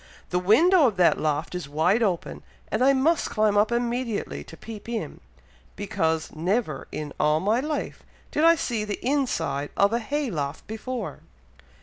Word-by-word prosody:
The 180 - +2
window 295 - +5
of 210 -5 -2
that 180 -2 +4
loft 155 +2 -1
is 180 -5 -5
wide 170 +10 +2
open, 190 -6 -1 0.3
and - - 0
I 270 - +6
must 290 +5 +2
climb 215 -1 +2
up 210 +3 +3
immediately 235 - -2
to - - -12
peep 220 0 -9
in, 235 -1 -4 0.6
because 160 -6 -1
never, 170 - -1
in 150 -2 -5
all 150 +1 +3
my 210 +7 +1
life, 300 +2 -3 0.3
did 300 - 0
I 335 0 +7
see 235 -8 -2
the 210 -1 -3
inside 205 - 0
of 200 +2 +4
a 235 - +2
hay 280 +3 -2
loft 145 -3 -4
before!" 235 +3 -5
210 Hz, 165 wpm, -25 LUFS, 160-250 Hz, 0.6 s, I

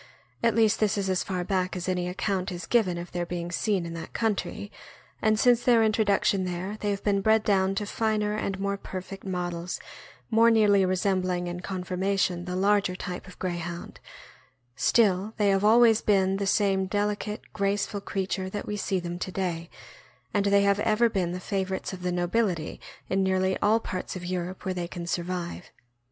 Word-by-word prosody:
at 230 0 +2
least 220 -2 +3
this 215 -1 +2
is 195 -1 0
as 185 - +1
far 185 -2 -2
back 185 -1 -1
as 180 0 -4
any 180 -1 0
account 185 0 -2
is 175 -1 -5
given 195 -7 +2
of 170 0 -7
their 175 0 -2
being 175 0 -4
seen 190 0 0
in 165 - -6
that 165 -1 -7
country, 210 -2 -2 0.5
and 215 -1 +3
since 245 0 +4
their 235 -2 +5
introduction 205 -3 +2
there 185 +3 -3
they 210 - 0
have 200 -1 -2
been 200 -1 +2
bred 220 +1 +4
down 195 -2 +2
to 210 - -1
finer 210 0 0
and 195 -2 -2
more 200 0 -1
perfect 195 0 -7
models, 175 -2 -3 0.5
more 230 +1 +6
nearly 210 -3 +5
resembling 185 -1 0
in 175 0 -4
conformation 185 -1 -1
the 180 0 -4
larger 200 -1 +2
type 180 +1 -6
of 180 - -13
Greyhound; 175 -1 -5 0.8
still 205 - +2
they 205 -2 +3
have 195 0 +2
always 225 +1 +6
been 195 -2 +2
the 200 0 -2
same 195 -2 +2
delicate, 205 +1 -2
graceful 200 0 -1
creature 190 -1 -2
that 205 +1 -5
we 210 - -3
see 195 -2 -1
them 175 0 -5
to 185 - -4
day; 175 -3 -3 0.6
and 205 -1 +2
they 200 0 +4
have 200 0 +3
ever 220 +2 +3
been 185 -5 -1
the 180 - -4
favorites 190 0 -3
of 185 - -7
the 180 0 -1
nobility 175 -1 0 0.3
in 195 +1 +1
nearly 190 0 +1
all 215 +2 +3
parts 185 -4 -5
of 180 -1 -6
Europe 180 +1 -4
where 190 - 0
they 175 -1 -3
can 175 -1 -6
survive. 175 0 -3
190 Hz, 185 wpm, -27 LUFS, 180-205 Hz, 0.8 s, more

